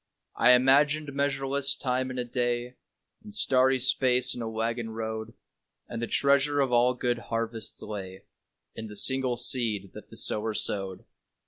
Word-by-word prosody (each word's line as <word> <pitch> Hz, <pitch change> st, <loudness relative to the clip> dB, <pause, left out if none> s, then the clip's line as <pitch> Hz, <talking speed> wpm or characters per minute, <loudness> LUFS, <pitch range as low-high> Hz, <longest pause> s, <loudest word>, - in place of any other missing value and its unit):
I 125 Hz, -, +6 dB
imagined 140 Hz, +3 st, +3 dB
measureless 140 Hz, 0 st, +1 dB
time 130 Hz, 0 st, -2 dB
in 130 Hz, -, -7 dB
a 125 Hz, -, -2 dB
day, 120 Hz, 0 st, -2 dB, 0.5 s
And 215 Hz, 0 st, -12 dB
starry 130 Hz, -9 st, +3 dB
space 125 Hz, -1 st, +3 dB
in 120 Hz, -, -6 dB
a 115 Hz, -, -4 dB
waggon 115 Hz, +1 st, -3 dB
road, 110 Hz, 0 st, -6 dB, 0.5 s
And 115 Hz, -, -6 dB
the 120 Hz, -, -3 dB
treasure 140 Hz, +1 st, +2 dB
of 135 Hz, -2 st, +1 dB
all 125 Hz, +1 st, +3 dB
good 120 Hz, -1 st, -2 dB
harvests 115 Hz, -1 st, -3 dB
lay 95 Hz, -3 st, -8 dB, 0.5 s
In 110 Hz, 0 st, -8 dB
the 105 Hz, -, -10 dB
single 130 Hz, +3 st, +2 dB
seed 115 Hz, -6 st, 0 dB
that -, -, -12 dB
the -, -, -9 dB
sower 110 Hz, 0 st, -1 dB
sowed. 95 Hz, -3 st, -2 dB
125 Hz, 155 wpm, -27 LUFS, 110-135 Hz, 0.5 s, I